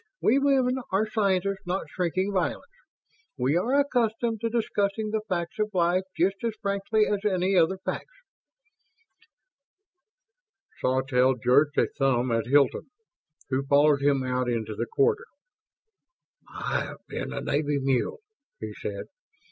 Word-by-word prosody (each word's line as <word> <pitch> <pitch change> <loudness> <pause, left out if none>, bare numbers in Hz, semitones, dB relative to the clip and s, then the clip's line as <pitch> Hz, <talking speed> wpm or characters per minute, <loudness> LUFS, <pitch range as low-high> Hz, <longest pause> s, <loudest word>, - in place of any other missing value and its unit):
"We 260 +6 +3
women 265 -2 +2
are 195 +3 +2
scientists, 195 -3 0
not 185 +2 -2
shrinking 185 +3 -1
violets. 190 - -2 0.7
We 130 +4 +1
are 245 +11 +2
accustomed 230 -5 0
to 230 - 0
discussing 215 -2 -1
the 220 0 0
facts 170 +1 -3
of 215 0 +1
life 180 +1 +2
just 195 +3 +2
as 230 -2 -1
frankly 200 +1 +1
as 205 -1 0
any 190 -2 +1
other 180 +2 +3
facts." - - -6 2.6
Sawtelle 130 0 +2
jerked 130 +5 +2
a - - +4
thumb 130 -2 +2
at 115 0 0
Hilton, 140 0 +2 0.6
who 130 +1 +1
followed 145 0 +4
him 140 -2 +2
out 125 -1 -1
into 110 -2 -2
the 115 +3 -3
corridor. 450 +2 +1 1.2
"I - - -2
have - - -11
been - - -5
a - - -4
Navy 145 0 0
mule," 135 - 0 0.4
he - - -6
said. - - -6
185 Hz, 135 wpm, -26 LUFS, 140-215 Hz, 2.6 s, a